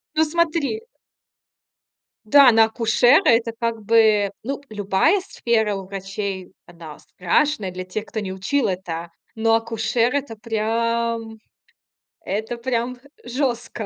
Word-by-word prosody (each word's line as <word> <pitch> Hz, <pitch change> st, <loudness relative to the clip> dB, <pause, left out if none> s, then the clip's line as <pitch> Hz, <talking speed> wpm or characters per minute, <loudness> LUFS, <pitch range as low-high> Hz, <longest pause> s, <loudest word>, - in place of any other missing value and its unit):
Ну 315 Hz, -, +4 dB
смотри 335 Hz, +5 st, -1 dB, 1.4 s
Да, 270 Hz, +3 st, +7 dB
на 225 Hz, 0 st, +6 dB
акушера- 240 Hz, -, +3 dB
это 230 Hz, 0 st, +3 dB
как 230 Hz, -1 st, -3 dB
бы, 215 Hz, -2 st, +4 dB
ну, 275 Hz, +3 st, -4 dB
любая 210 Hz, -, +2 dB
сфера 225 Hz, -, 0 dB
у 195 Hz, -1 st, -6 dB
врачей- 195 Hz, -1 st, -5 dB
она 165 Hz, -3 st, -12 dB
страшная, 210 Hz, -, 0 dB
для 185 Hz, 0 st, -6 dB
тех 195 Hz, +4 st, -5 dB
кто 220 Hz, -, -5 dB
не 190 Hz, -2 st, -5 dB
учил 190 Hz, +9 st, 0 dB
это, 170 Hz, -2 st, -5 dB, 0.2 s
но 225 Hz, 0 st, +2 dB
акушер- 230 Hz, +2 st, 0 dB
это 265 Hz, -6 st, -3 dB
прям, 230 Hz, 0 st, -2 dB, 0.8 s
это 220 Hz, +5 st, -4 dB
прям 245 Hz, 0 st, -2 dB, 0.3 s
жёстко. 240 Hz, -3 st, -3 dB
225 Hz, 120 wpm, -22 LUFS, 200-245 Hz, 1.4 s, Да